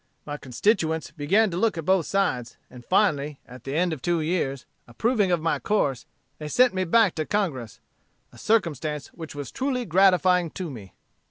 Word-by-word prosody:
"My 145 Hz, -, -5 dB
constituents 160 Hz, -, 0 dB
began 185 Hz, +8 st, +2 dB
to 170 Hz, -, -3 dB
look 215 Hz, -2 st, +1 dB
at 165 Hz, -, -4 dB
both 190 Hz, -3 st, +2 dB
sides; 130 Hz, -12 st, -1 dB
and 125 Hz, -1 st, -12 dB
finally, 150 Hz, -, +1 dB
at 125 Hz, -1 st, -13 dB
the 135 Hz, +1 st, -4 dB
end 175 Hz, +1 st, +1 dB
of 145 Hz, -, -7 dB
two 175 Hz, +3 st, 0 dB
years, 155 Hz, -5 st, -2 dB, 0.2 s
approving 205 Hz, -, +1 dB
of 170 Hz, -3 st, +1 dB
my 165 Hz, -, 0 dB
course, 145 Hz, -, -1 dB, 0.3 s
they 150 Hz, -, -6 dB
sent 250 Hz, +9 st, +3 dB
me 185 Hz, 0 st, -1 dB
back 210 Hz, +1 st, +4 dB
to 155 Hz, -, -3 dB
Congress 150 Hz, -, -2 dB, 0.5 s
a -, -, -14 dB
circumstance 155 Hz, -, -1 dB
which 160 Hz, -3 st, -10 dB
was 145 Hz, -2 st, -6 dB
truly 260 Hz, -2 st, -2 dB
gratifying 180 Hz, -1 st, +3 dB
to 175 Hz, -1 st, -6 dB
me. 100 Hz, -8 st, -11 dB
165 Hz, 180 wpm, -25 LUFS, 145-195 Hz, 0.5 s, back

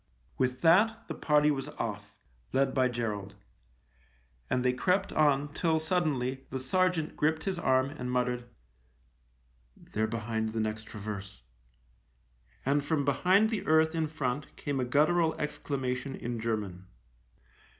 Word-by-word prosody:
With 130 Hz, 0 st, 0 dB
that 220 Hz, +7 st, +4 dB
the -, -, -4 dB
party 150 Hz, 0 st, +3 dB
was 135 Hz, -1 st, -2 dB
off, 105 Hz, -6 st, -5 dB, 0.4 s
led 135 Hz, 0 st, +2 dB
by 130 Hz, -1 st, +3 dB
Gerald. 105 Hz, -5 st, -3 dB, 1.1 s
And 125 Hz, 0 st, 0 dB
they 125 Hz, -, +3 dB
crept 180 Hz, +10 st, +1 dB
on 145 Hz, -1 st, +2 dB
till, 160 Hz, -1 st, +1 dB
suddenly, 145 Hz, -6 st, -1 dB
the 135 Hz, -, -3 dB
sergeant 165 Hz, +4 st, +1 dB
gripped 155 Hz, +1 st, +1 dB
his 190 Hz, -3 st, -2 dB
arm 130 Hz, -3 st, +2 dB
and 125 Hz, -4 st, -5 dB
muttered: 125 Hz, -1 st, -1 dB, 0.7 s
" -, -, -37 dB, 0.2 s
They're 110 Hz, +1 st, +1 dB
behind 110 Hz, 0 st, -2 dB
the 115 Hz, -, -1 dB
next 110 Hz, 0 st, -2 dB
traverse." 100 Hz, -, -7 dB, 1.2 s
And 140 Hz, +2 st, +2 dB
from 145 Hz, -1 st, 0 dB
behind 185 Hz, -, +3 dB
the 220 Hz, -, -1 dB
earth 160 Hz, +1 st, +4 dB
in 160 Hz, -1 st, 0 dB
front 140 Hz, -2 st, -3 dB
came 145 Hz, -2 st, -3 dB
a 125 Hz, -, 0 dB
guttural 160 Hz, +5 st, +2 dB
exclamation 135 Hz, -2 st, -3 dB
in 120 Hz, -1 st, -4 dB
German. 105 Hz, -5 st, -3 dB
130 Hz, 140 wpm, -30 LUFS, 115-155 Hz, 1.2 s, that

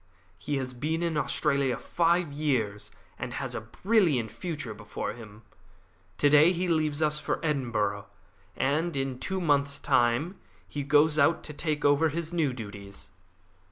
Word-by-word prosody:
He 145 Hz, -, -2 dB
has 130 Hz, -1 st, -4 dB
been 155 Hz, +7 st, -2 dB
in 165 Hz, -2 st, -1 dB
Australia 140 Hz, -2 st, +1 dB
five 170 Hz, -2 st, +1 dB
years, 125 Hz, -9 st, -1 dB, 0.3 s
and -, -, -5 dB
has -, -, -3 dB
a -, -, -3 dB
brilliant 145 Hz, -, +1 dB
future 150 Hz, -10 st, -5 dB
before 105 Hz, 0 st, -5 dB
him. 110 Hz, -1 st, -12 dB, 0.7 s
To 145 Hz, -, +4 dB
day 150 Hz, +4 st, +6 dB
he 180 Hz, 0 st, -1 dB
leaves 155 Hz, -2 st, +1 dB
us 150 Hz, 0 st, +1 dB
for -, -, -2 dB
Edinburgh, 110 Hz, -9 st, -1 dB, 0.5 s
and 155 Hz, +5 st, 0 dB
in 135 Hz, -2 st, -2 dB
two 190 Hz, +6 st, -2 dB
months' 145 Hz, -4 st, +1 dB
time, 120 Hz, +10 st, +1 dB, 0.3 s
he 145 Hz, -, -4 dB
goes 150 Hz, +2 st, +3 dB
out 155 Hz, +3 st, +3 dB
to 150 Hz, -, -7 dB
take 150 Hz, 0 st, -2 dB
over 145 Hz, +3 st, +4 dB
his 165 Hz, +2 st, -4 dB
new 160 Hz, -5 st, +1 dB
duties. 100 Hz, -4 st, -9 dB
145 Hz, 155 wpm, -28 LUFS, 120-160 Hz, 0.7 s, day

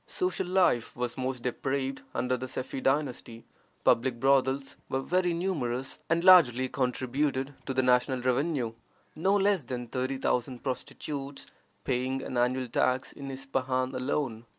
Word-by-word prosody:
Social 365 Hz, -, -1 dB
life 180 Hz, -11 st, +2 dB
was 125 Hz, -1 st, -2 dB
most 130 Hz, -2 st, -3 dB
depraved 135 Hz, +2 st, -2 dB
under 125 Hz, +2 st, +1 dB
the 130 Hz, +1 st, -5 dB
Sefi 130 Hz, +1 st, -5 dB
dynasty. 130 Hz, -5 st, -1 dB, 0.4 s
Public 120 Hz, 0 st, +3 dB
brothels 135 Hz, +1 st, +2 dB
were 130 Hz, -, 0 dB
very 180 Hz, +2 st, +1 dB
numerous, 135 Hz, -8 st, -2 dB
and 165 Hz, +1 st, +2 dB
largely 130 Hz, -9 st, +7 dB
contributed 130 Hz, +2 st, -1 dB
to 135 Hz, -, -1 dB
the 130 Hz, -, +3 dB
national 125 Hz, +1 st, +3 dB
revenue, 130 Hz, -1 st, 0 dB, 0.4 s
no 190 Hz, +6 st, +2 dB
less 200 Hz, -4 st, +2 dB
than 125 Hz, 0 st, -4 dB
thirty 130 Hz, +3 st, -2 dB
thousand 125 Hz, -1 st, -1 dB
prostitutes 140 Hz, +1 st, -4 dB, 0.4 s
paying 130 Hz, +1 st, -1 dB
an -, -, -5 dB
annual 125 Hz, +1 st, +1 dB
tax 130 Hz, +2 st, +1 dB
in 140 Hz, -1 st, -8 dB
Ispahan 130 Hz, -1 st, -2 dB
alone. 125 Hz, -3 st, -2 dB
130 Hz, 140 wpm, -29 LUFS, 125-140 Hz, 0.4 s, largely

